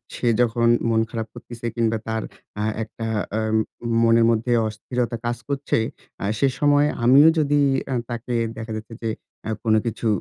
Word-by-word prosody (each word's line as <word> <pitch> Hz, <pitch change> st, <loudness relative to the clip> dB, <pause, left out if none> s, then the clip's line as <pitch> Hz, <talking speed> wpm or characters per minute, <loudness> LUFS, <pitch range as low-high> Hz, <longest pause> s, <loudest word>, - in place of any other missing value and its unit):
সে 120 Hz, -, -2 dB
যখন 115 Hz, 0 st, +2 dB, 0.2 s
মন 110 Hz, -1 st, +3 dB
খারাপ 115 Hz, -1 st, -4 dB
করতেছে 120 Hz, -1 st, -10 dB
কিংবা 115 Hz, -1 st, +1 dB
তার 110 Hz, 0 st, -1 dB, 0.3 s
অ্যা 105 Hz, -, -1 dB, 0.2 s
একটা 115 Hz, +1 st, -6 dB, 0.2 s
অ্যা 110 Hz, -, -1 dB, 0.6 s
মনের 115 Hz, 0 st, +5 dB
মধ্যে 115 Hz, +2 st, 0 dB, 0.2 s
অস্থিরতা 120 Hz, +2 st, -3 dB
কাজ 120 Hz, 0 st, -1 dB
করছে। 140 Hz, 0 st, -1 dB, 0.4 s
অ্যা -, -, -2 dB
সে 140 Hz, -, +4 dB
সময় 145 Hz, 0 st, +4 dB, 0.2 s
আমিও 135 Hz, +6 st, +7 dB
যদি 145 Hz, -1 st, +2 dB, 0.3 s
অ্যা 135 Hz, -, -2 dB
তাকে 120 Hz, +1 st, -3 dB, 0.2 s
দেখা 110 Hz, 0 st, -6 dB
যাচ্ছে 110 Hz, +1 st, -8 dB
যে 115 Hz, -, 0 dB, 0.3 s
অ্যা 110 Hz, -, -3 dB
কোন 110 Hz, -2 st, +2 dB
কিছু 115 Hz, 0 st, -2 dB
115 Hz, 165 wpm, -23 LUFS, 110-125 Hz, 0.6 s, আমিও